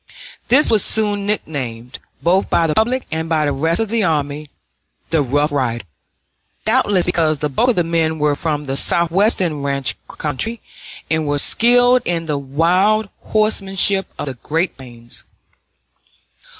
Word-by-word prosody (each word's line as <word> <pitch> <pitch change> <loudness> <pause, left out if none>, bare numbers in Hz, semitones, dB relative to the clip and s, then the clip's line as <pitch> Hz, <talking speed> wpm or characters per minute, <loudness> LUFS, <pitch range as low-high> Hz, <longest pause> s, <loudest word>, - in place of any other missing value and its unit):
This 285 +4 +4
was 215 -3 +3
soon 205 -2 +1
nicknamed, 130 - -4 0.2
both 185 +3 +2
by 170 - +2
the 155 - 0
public 240 +8 +1
and 160 0 -3
by 155 -2 +1
the 145 - 0
rest 160 +6 0
of 225 -2 -1
the 230 -1 0
army, 150 -3 -1 0.6
the 160 -2 +3
Rough 145 +3 0
Riders, 120 -6 -2 0.8
doubtless 190 -4 +2
because 160 -3 +1
the 150 +1 -2
bulk 235 - +1
of 245 - +2
the 175 - +2
men 165 -1 0
were 150 -1 +1
from 150 -1 -3
the 135 0 -3
Southwestern 170 0 +1
ranch 140 -1 -1
country 190 - -4 0.5
and 160 -1 -1
were 145 0 0
skilled 245 - +3
in 170 -1 -1
the 150 -3 -2
wild 180 +10 +1 0.2
horsemanship 195 -2 +1
of - - -4
the 135 - -4
great 160 +8 -2
plains. 120 -3 -6
165 Hz, 150 wpm, -18 LUFS, 145-200 Hz, 0.8 s, This